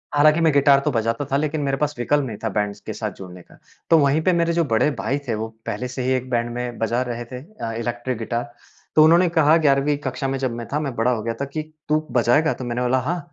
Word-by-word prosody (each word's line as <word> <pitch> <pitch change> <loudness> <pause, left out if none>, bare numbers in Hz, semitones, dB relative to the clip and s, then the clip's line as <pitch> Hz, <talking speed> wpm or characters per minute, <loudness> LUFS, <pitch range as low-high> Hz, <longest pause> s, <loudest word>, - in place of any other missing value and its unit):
हालाँकि 155 +3 +5
मैं 165 -1 +4
गिटार 140 0 +5
तो 150 - +2
बजाता 115 +2 -1
था 140 - +3
लेकिन 150 0 -1
मेरे 135 -1 0
पास 150 +1 -1
विकल्प 140 +4 +1
नहीं 110 -5 -6
था 110 - 0
बैंड्स 105 0 -2
के 110 - -6
साथ 105 -1 -4
जुड़ने 90 -2 -10
का। - - -20 0.3
तो 165 - +7
वहीं 140 +2 +3
पे 185 - +3
मेरे 170 0 +1
जो 170 0 +2
बड़े 125 +3 +2
भाई 135 - -1
थे 115 - 0
वो 110 +1 -3 0.2
पहले 125 - -3
से 125 +1 -5
ही 130 - 0
एक 130 0 -7
बैंड 120 -1 0
में 125 -1 -4
बजा 115 +2 0
रहे 120 0 -4
थे 125 +2 -8
अ, 150 - -7
इलेक्ट्रिक 120 +2 -3
गिटार। 120 +1 -3 0.4
तो 155 - +7
उन्होंने 170 +3 +5
कहा 160 -1 +4
ग्यारहवीं 145 -1 +2
कक्षा 130 +1 -2
में 135 0 -1
जब 130 -2 -1
मैं 120 -1 -6
था, 150 - +1
मैं 140 -5 -3
बड़ा 115 +3 +2
हो 115 -3 -1
गया 115 0 -2
था 140 - 0
कि, 155 +3 -4 0.3
"तू 155 +1 +1
बजाएगा?" 125 +6 +3
तो - - -8
मैंने 120 +1 -2
बोला, 125 +1 +2
"हाँ, 170 +8 -2
130 Hz, 265 wpm, -22 LUFS, 120-150 Hz, 0.4 s, तो